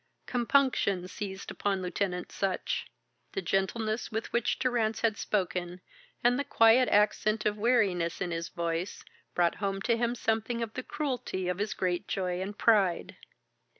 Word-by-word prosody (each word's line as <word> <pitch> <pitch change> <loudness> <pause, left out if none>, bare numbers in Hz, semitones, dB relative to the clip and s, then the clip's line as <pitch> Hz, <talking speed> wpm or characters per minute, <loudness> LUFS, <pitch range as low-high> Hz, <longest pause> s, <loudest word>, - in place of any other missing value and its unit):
Compunction 240 -7 +2
seized 190 0 -6
upon 195 -2 -1
Lieutenant 180 0 -2
Sutch. 190 -2 -2 0.5
The 390 - -1
gentleness 215 +4 -1
with 220 +1 -4
which 235 -1 +1
Durrance 235 -4 0
had 225 -2 +2
spoken, 180 -4 -2 0.4
and 245 +2 +4
the - - +1
quiet 245 -2 +5
accent 215 +1 +2
of 210 -1 +2
weariness 205 -7 +2
in 175 - -2
his 165 0 -3
voice, 170 +2 -3 0.3
brought 175 -1 +3
home 195 -1 -1
to 235 - +3
him 235 +1 0
something 230 +1 0
of 225 -1 -6
the 255 - -3
cruelty 250 -10 -3
of 180 +1 -1
his 210 +1 -1
great 180 -2 -1
joy 180 -1 -1
and 200 +2 -5
pride. 200 -6 +3
210 Hz, 150 wpm, -30 LUFS, 185-230 Hz, 0.5 s, quiet